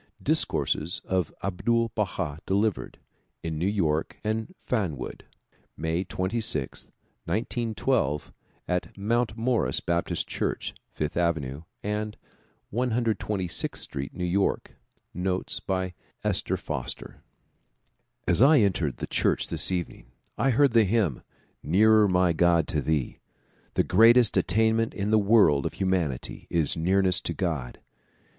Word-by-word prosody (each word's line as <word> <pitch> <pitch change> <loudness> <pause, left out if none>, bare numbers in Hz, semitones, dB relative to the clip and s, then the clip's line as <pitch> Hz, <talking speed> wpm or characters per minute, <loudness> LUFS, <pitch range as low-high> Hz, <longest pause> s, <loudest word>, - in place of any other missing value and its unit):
Discourses 80 +3 0
of 90 -4 0
Abdul 115 +5 +1
Baha 90 -8 -2
delivered 100 +1 0 0.5
in 80 -2 -3
New 90 - +1
York 80 -7 0
and 110 - -2
Fanwood. 95 - -3 0.5
May 80 +3 -1
26, 95 - -2 0.4
1912, 110 - -1 0.3
at 90 +3 -2
Mount 110 +2 0
Morris 120 0 +1
Baptist 85 0 -1
Church, - - -3 0.2
Fifth 75 0 -3
Ave. 80 -5 -1 0.2
and 105 +1 -3 0.6
126th 110 -6 0
Street, 70 -1 -5
New 90 - -2
York. 95 +3 0 0.4
Notes 90 +1 -2
by 95 -1 -2 0.3
Esther - - 0
Foster - - -5 1.1
AS - - +4
I 145 +4 +7
entered 90 - +1
the - - -4
church - - 0
this - - +2
evening 90 -8 -4 0.3
I 135 +4 +1
heard 135 +2 +4
the 115 -1 +6
hymn 100 - +1
' - - -36
' - - -49
Nearer 110 +5 +5
my 90 -2 +3
God, 85 -1 +3
to 75 - 0
Thee." 75 -1 -1 0.6
The - - +3
greatest 115 +4 +5
attainment 110 +1 +2
in 100 +1 -1
the 110 - +5
world 100 -9 +4
of - - -7
humanity 90 -9 -1
is 80 -4 +1
nearness 95 +2 +2
to - - -3
God. 75 -10 -3
95 Hz, 125 wpm, -27 LUFS, 85-110 Hz, 1.1 s, I